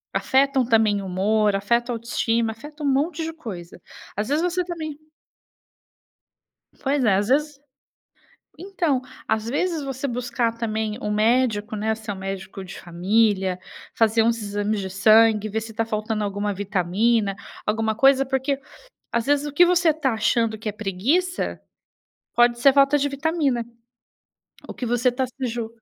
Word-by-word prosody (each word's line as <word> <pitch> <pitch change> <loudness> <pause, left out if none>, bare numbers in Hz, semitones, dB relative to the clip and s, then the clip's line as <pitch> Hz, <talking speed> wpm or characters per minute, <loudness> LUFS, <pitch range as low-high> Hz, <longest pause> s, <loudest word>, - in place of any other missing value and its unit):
afetam 270 0 +2
também 220 -3 +3
humor, 200 +2 +1
afetam 235 +4 0
a - - -3
autoestima, 230 0 0
afeta 295 +7 -10
um - - +1
monte 300 +4 0
de 325 0 -4
coisa, 180 - -9 0.3
às 210 +1 -2
vezes 295 +3 +1
você 360 +1 0
também 320 -4 -6 1.8
pois 275 0 0
é, 210 -5 +4
às 200 +1 0
vezes 290 +2 +1 1.0
então, 345 -8 -1 0.3
às 220 0 0
vezes 315 +3 -1
você 270 0 -4
buscar 240 -1 -1
também 220 -1 -3
um 210 -6 -3
médico, 220 -1 +1
né, 220 +1 0
se 220 -1 -9
é - - 0
um 195 - -9
médico 195 0 -6
de 185 - -9
família, 190 +1 +1 0.3
fazer 225 0 +3
uns 230 0 +1
exames 205 0 -2
de 190 - -4
sangue, 215 +2 +4
ver 220 +1 -2
se 225 0 -9
tá 225 0 0
faltando 215 -1 -2
alguma 205 +1 -2
vitamina, 200 +2 +1 0.3
alguma 220 +1 +1
coisa, 270 +3 +4
porque 270 +1 -1 0.5
às 235 -1 0
vezes 290 0 +2
o 295 - -5
que 350 +5 +6
você 350 -2 +4
tá 285 -5 -1
achando 225 0 +1
que 215 0 -5
é - - -2
preguiça 235 - -1 0.7
pode 240 0 +4
ser 275 +2 +6
falta 275 +1 +4
de 285 +1 0
vitamina. 280 -4 0 1.0
O - - -5
que 250 - -5
você 245 +2 +2
tá 260 +1 -1
se 255 +1 -5
ju 230 -1 -3
230 Hz, 160 wpm, -23 LUFS, 210-275 Hz, 1.8 s, que